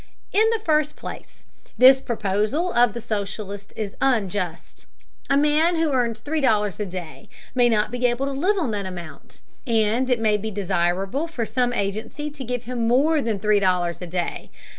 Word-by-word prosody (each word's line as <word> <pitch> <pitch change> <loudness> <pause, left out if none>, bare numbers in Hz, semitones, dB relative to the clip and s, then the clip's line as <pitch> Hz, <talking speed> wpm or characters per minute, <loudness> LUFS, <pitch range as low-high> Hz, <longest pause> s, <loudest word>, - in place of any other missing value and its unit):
In 435 +3 +4
the 455 - +2
first 305 -2 +2
place, - - -10 0.3
this 265 +1 +7
proposal 220 - -1
of 240 -3 +4
the 235 - -5
socialist 200 -1 -5
is 205 -2 -4
unjust. 190 -9 -1 0.4
A 275 - +4
man 300 +4 +3
who 325 -2 +1
earns 235 -3 +1
three 295 +7 -2
dollars 210 -7 +1
a 210 - -2
day 180 -3 -8 0.2
may 245 -2 +4
not 215 -2 +1
be 245 0 +1
able 240 +3 -1
to 275 - -2
live 360 +10 +1
on 315 -11 0
that 200 -2 -3
amount, 170 -6 -10 0.3
and 230 +2 +2
it 250 -2 +2
may 215 -2 +2
be 220 +2 -4
desirable 190 - -1
for 255 -9 -3
some 245 +1 0
agency 225 +8 -3
to 285 -2 -8
give 245 0 -3
him 240 -1 -2
more 290 +6 +3
than 225 -5 -1
three 210 +1 +3
dollars 180 -3 0
a 180 - -5
day. 175 0 -3
230 Hz, 185 wpm, -23 LUFS, 200-270 Hz, 0.4 s, this